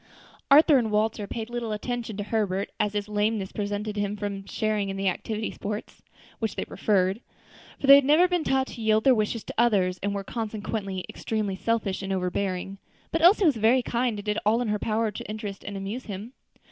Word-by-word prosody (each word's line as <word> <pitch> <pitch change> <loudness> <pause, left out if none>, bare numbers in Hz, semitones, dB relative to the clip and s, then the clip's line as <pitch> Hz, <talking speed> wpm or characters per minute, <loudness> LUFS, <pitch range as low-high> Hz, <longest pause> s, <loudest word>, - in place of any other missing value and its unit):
Arthur 290 0 +7
and 225 -3 -1
Walter 210 0 0
paid 225 +2 -5
but - - -12
little 235 -2 -3
attention 225 -1 -4
to 205 - -2
Herbert, 200 -3 -1
as 210 -1 +1
his 205 0 -2
lameness 210 -1 -1
prevented 205 0 -3
him 205 0 -1
from 200 -1 -5
sharing 215 -2 -1
in 195 - -4
the 195 0 -1
active 215 +4 -2
sports 210 +1 -6 0.4
which 225 -2 -2
they - - -3
preferred; 195 +1 +1 0.6
for - - -3
they 275 - +10
had 280 0 +8
never 310 +6 +5
been 355 -2 0
taught 265 -2 +1
to 235 - -9
yield 220 0 +3
their 265 - +6
wishes 215 0 -1
to - - -7
others, 190 -6 +2
and 200 +1 -1
were 200 - -3
consequently 210 -3 -4
extremely 215 -3 -3
selfish 205 -2 -1
and 195 0 -4
overbearing; 190 +1 -2 0.3
but 330 - 0
Elsie 375 +4 +6
was 295 -7 +4
very 235 +4 +4
kind, 240 -2 -1
and 205 - -7
did 210 0 0
all 220 +3 +3
in 245 -3 -1
her 210 0 0
power 220 +1 0
to 210 - -8
interest 210 -2 -6
and 200 0 -6
amuse 200 +6 -5
him. 210 +4 -7
215 Hz, 210 wpm, -26 LUFS, 200-230 Hz, 0.6 s, they